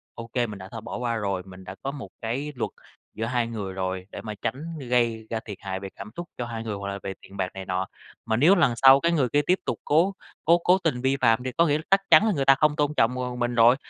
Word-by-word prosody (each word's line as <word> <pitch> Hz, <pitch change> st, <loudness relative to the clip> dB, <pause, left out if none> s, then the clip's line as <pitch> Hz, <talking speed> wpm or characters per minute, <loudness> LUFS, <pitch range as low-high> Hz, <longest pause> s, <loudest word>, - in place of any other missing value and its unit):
ô 115 Hz, 0 st, -7 dB
kê 120 Hz, -2 st, +1 dB
mình 105 Hz, -2 st, -8 dB
đã 95 Hz, +1 st, -9 dB
thôi 115 Hz, -2 st, -6 dB
bỏ -, -, -6 dB
qua 120 Hz, -1 st, -1 dB
rồi, 100 Hz, -4 st, -2 dB
mình 95 Hz, 0 st, -12 dB
đã 95 Hz, +1 st, -8 dB
có 135 Hz, -, -2 dB
một 140 Hz, -2 st, -8 dB
cái 130 Hz, +7 st, -3 dB
luật 120 Hz, -, -3 dB, 0.4 s
giữa 110 Hz, -, -2 dB
hai 120 Hz, 0 st, 0 dB
người 100 Hz, -5 st, -5 dB
rồi 95 Hz, 0 st, -3 dB
để -, -, -7 dB
mà 105 Hz, -1 st, -5 dB
tránh 155 Hz, +8 st, -4 dB
gây 115 Hz, -3 st, +1 dB
ra 115 Hz, -, -2 dB
thiệt 105 Hz, -4 st, -7 dB
hại 95 Hz, -1 st, -4 dB
về 95 Hz, -, -7 dB
cảm 100 Hz, +2 st, -8 dB
xúc 175 Hz, -, -5 dB
cho 120 Hz, -, -1 dB
hai 115 Hz, -1 st, -5 dB
người, 110 Hz, -2 st, -3 dB
hoặc 100 Hz, 0 st, -5 dB
là 100 Hz, 0 st, -4 dB
về 95 Hz, -, -4 dB
tiền 100 Hz, -, -13 dB
bạc 95 Hz, -1 st, 0 dB
này 95 Hz, 0 st, -7 dB
nọ. 95 Hz, 0 st, -2 dB, 0.4 s
Mà 110 Hz, -1 st, 0 dB
nếu 170 Hz, +10 st, +6 dB
lần 140 Hz, -9 st, +3 dB
sau 135 Hz, +2 st, +8 dB
cái 170 Hz, +2 st, +1 dB
người 135 Hz, -7 st, +2 dB
kia 145 Hz, +3 st, +3 dB
tiếp 185 Hz, +1 st, +3 dB
tục -, -, -2 dB
cố 170 Hz, +7 st, +3 dB, 0.3 s
cố 170 Hz, +2 st, +6 dB
cố 180 Hz, +2 st, +3 dB
tình 135 Hz, -7 st, 0 dB
vi 135 Hz, +1 st, +1 dB
phạm 115 Hz, +2 st, +4 dB
thì 130 Hz, -, -2 dB
có 170 Hz, +6 st, +3 dB
nghĩa 145 Hz, -, +2 dB
là 155 Hz, -, -7 dB
chắc 195 Hz, -, +5 dB
chắn 215 Hz, -, +8 dB
là 215 Hz, -, +3 dB
người 135 Hz, -3 st, -1 dB
ta 135 Hz, -, +7 dB
không 150 Hz, +1 st, +2 dB
tôn 150 Hz, -1 st, +1 dB
trọng, 125 Hz, +3 st, +3 dB
ờ, 125 Hz, -1 st, -3 dB
mình 120 Hz, 0 st, -1 dB
rồi. 115 Hz, +2 st, +6 dB
120 Hz, 295 wpm, -25 LUFS, 105-145 Hz, 0.4 s, sau